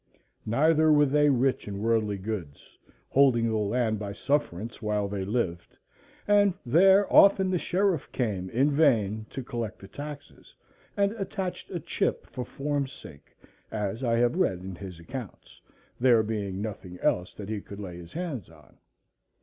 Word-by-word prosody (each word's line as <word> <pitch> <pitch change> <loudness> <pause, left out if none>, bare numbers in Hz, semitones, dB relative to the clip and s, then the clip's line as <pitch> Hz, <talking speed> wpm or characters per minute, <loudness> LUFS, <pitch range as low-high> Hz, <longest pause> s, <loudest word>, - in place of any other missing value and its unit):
Neither 155 +6 +4
were 150 -1 +6
they 145 +1 +3
rich 130 -2 +1
in 100 -1 -5
worldly 110 -2 +1
goods, 95 -8 -6 0.3
holding 130 -4 +4
the 110 - 0
land 110 +1 0
by 100 -1 -5
sufferance 115 -4 -2
while 105 -2 0
they 100 -1 -3
lived; 95 -5 -3 0.5
and 205 -2 +4
there 190 +10 +6
often 195 -1 +6
the 180 - +1
sheriff 185 -4 0
came 100 -7 -2
in 135 +7 +2
vain 110 -8 +2
to 135 - -6
collect 120 -4 -4
the 95 - -12
taxes, 145 +5 -10 0.4
and 200 0 +3
"attached 190 -1 -4
a 175 - -3
chip," - - -2
for 125 - -4
form's 140 +1 -2
sake, 70 -3 -14 0.3
as 110 +3 -3
I 115 -2 +2
have 120 +6 +2
read 95 - +1
in 95 0 -7
his 90 -2 -9
accounts, 120 +5 -9 0.4
there 120 -3 +5
being 100 -2 -3
nothing 95 -4 -7
else 90 0 0
that 100 -1 -8
he 110 -2 -3
could 100 +1 -10
lay 90 -4 -7
his 85 -1 -12
hands 160 - -4
on. 75 -5 -20
115 Hz, 160 wpm, -27 LUFS, 100-145 Hz, 0.5 s, were